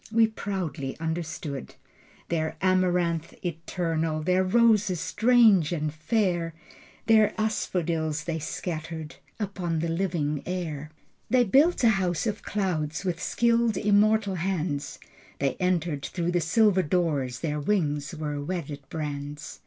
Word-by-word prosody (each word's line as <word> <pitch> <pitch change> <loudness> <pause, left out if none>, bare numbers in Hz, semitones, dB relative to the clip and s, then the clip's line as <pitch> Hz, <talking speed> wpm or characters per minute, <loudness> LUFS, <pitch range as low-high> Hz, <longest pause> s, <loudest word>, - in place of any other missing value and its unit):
We 225 0 +5
proudly 190 -10 -4
understood 160 -4 -4 0.5
Their 160 -1 -1
amaranth 180 -3 +1
eternal, 165 -2 -2
Their 185 +2 +3
roses 210 -3 +3
strange 220 -8 +4
and 155 -3 -2
fair, 170 -1 0 0.5
The 220 -1 +4
asphodels 165 -7 -1
they 160 0 -3
scattered 160 0 -5 0.2
Upon 190 -5 -2
the 165 +1 -1
living 165 -5 -1
air. 160 -5 -4 0.4
They 250 -1 +5
built 280 - +4
a 230 - +7
house 185 -4 0
of 210 -2 -2
clouds 175 -5 -2
With 180 -1 -2
skilled 235 -3 +2
immortal 210 0 +3
hands. 170 -5 -2 0.4
They 140 -1 0
entered 175 -5 0
through 175 -1 -2
the 175 -1 +1
silver 190 +3 +4
doors. 145 -7 0
Their 150 -2 -1
wings 150 -4 0
were 150 -2 -3
wedded 150 -3 -4
brands. 150 -1 -5
170 Hz, 120 wpm, -27 LUFS, 155-195 Hz, 0.5 s, a